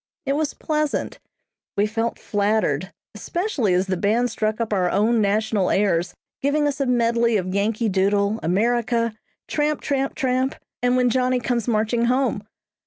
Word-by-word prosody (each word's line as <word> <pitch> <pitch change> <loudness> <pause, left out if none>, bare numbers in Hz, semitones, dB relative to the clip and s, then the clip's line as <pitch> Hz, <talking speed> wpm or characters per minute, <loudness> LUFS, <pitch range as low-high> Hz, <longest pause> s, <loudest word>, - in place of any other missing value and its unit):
It 275 - +1
was 300 0 -1
pleasant. 305 -1 -2 0.6
We 205 - +3
felt 225 +2 -2
flattered, 200 -5 0 0.2
especially 260 - -1
as 185 +1 +2
the 190 -1 -1
band 225 +5 +1
struck 215 0 -1
up 225 -2 -1
our 185 -3 +2
own 220 +4 +2
national 210 -1 +1
airs, 180 -3 +1 0.3
giving 295 +2 +1
us 285 -1 -2
a 275 - +1
medley 235 -2 +2
of 185 -1 -3
"Yankee 215 +3 0
Doodle," 200 +2 +1
"America," 230 +5 +1 0.3
"Tramp, 300 0 0
Tramp, 275 -1 -1
Tramp," 260 0 0 0.3
and 245 +1 +2
"When 250 -1 +3
Johnny 255 0 +1
Comes 240 -1 -1
Marching 230 +1 +1
Home." 250 -3 +1
230 Hz, 155 wpm, -22 LUFS, 205-255 Hz, 0.6 s, We